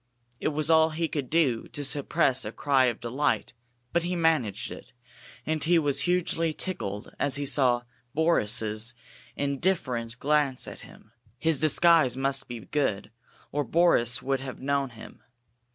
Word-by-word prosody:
It - - -1
was 155 +1 -1
all 160 0 +5
he 165 +1 -2
could 145 -5 -4
do 145 -8 +1
to 145 - -5
suppress 135 -2 +1
a - - -5
cry 135 -3 +2
of 120 -3 -1
delight, 130 +3 -1 0.4
but 170 - +2
he 175 +2 -2
managed 160 - 0
it, - - -11 0.5
and 155 -1 -1
he 170 +2 +4
was 145 -4 +1
hugely 165 -3 0
tickled 105 - -5
as 140 - +1
he 145 0 -2
saw 125 -3 +3 0.3
Boris's 115 -7 +1 0.4
indifferent 140 -6 -1
glance 145 -2 +1
at - - -8
him. - - -16 0.3
His 160 +2 +1
disguise 155 -3 +4
must 135 0 -1
be 120 -2 -7
good, 105 -4 -2 0.4
or 145 0 0
Boris 130 -5 +3
would 135 0 0
have 135 -1 -7
known 140 0 0
him. 115 -2 -13
140 Hz, 150 wpm, -27 LUFS, 125-160 Hz, 0.5 s, all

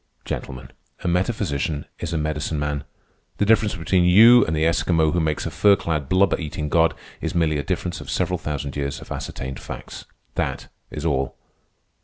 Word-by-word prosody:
Gentlemen, 65 -1 -6 0.3
a - - -2
metaphysician 85 - -1
is 85 - -4
a 85 - -1
medicine 75 0 -2
man. 75 -1 -2 0.5
The 105 - +2
difference 105 -1 +3
between 90 +2 +1
you 115 +7 +8
and 80 - -1
the 80 - +1
Eskimo 80 -1 +2
who 90 - +1
makes 80 -2 -1
a 85 - -3
fur 100 +6 +5
clad 75 -7 -3
blubber 95 0 +3
eating 75 -2 -4
god 80 +1 +3 0.3
is - - -3
merely 80 -3 +2
a - - -2
difference 90 -1 -3
of - - -10
several - - 0
thousand 70 -2 -4
years 70 -1 -3
of - - -13
ascertained 65 0 -5
facts. - - -8 0.3
That - - -3 0.2
is - - -6
all." 65 0 0
80 Hz, 180 wpm, -23 LUFS, 75-90 Hz, 0.5 s, you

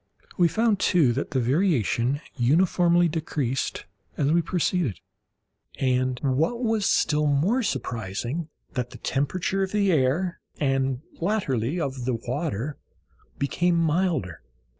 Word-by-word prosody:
We 175 - +4
found, 220 +4 +1
too, 155 -12 +3
that 135 - -3
the 130 - 0
variation 130 - +1
uniformly 175 +6 +3
decreased 150 -5 -2 0.3
as 145 +1 +2
we 170 +1 +4
proceeded, 170 - -1 0.8
and, 130 -1 +1
what 160 - +1
was 220 -3 +1
still 150 -1 +2
more 165 - +2
surprising, 125 - -3 0.2
that 125 -3 -2
the - - -11
temperature 180 +8 -1
of 190 -1 -1
the 200 -2 +2
air, 160 +5 +1 0.2
and 135 -1 0 0.2
latterly 165 - 0
of 135 -5 -3
the 125 -1 0
water, 130 - -3 0.6
became 175 +5 +1
milder. 165 - 0
150 Hz, 120 wpm, -25 LUFS, 130-175 Hz, 0.8 s, We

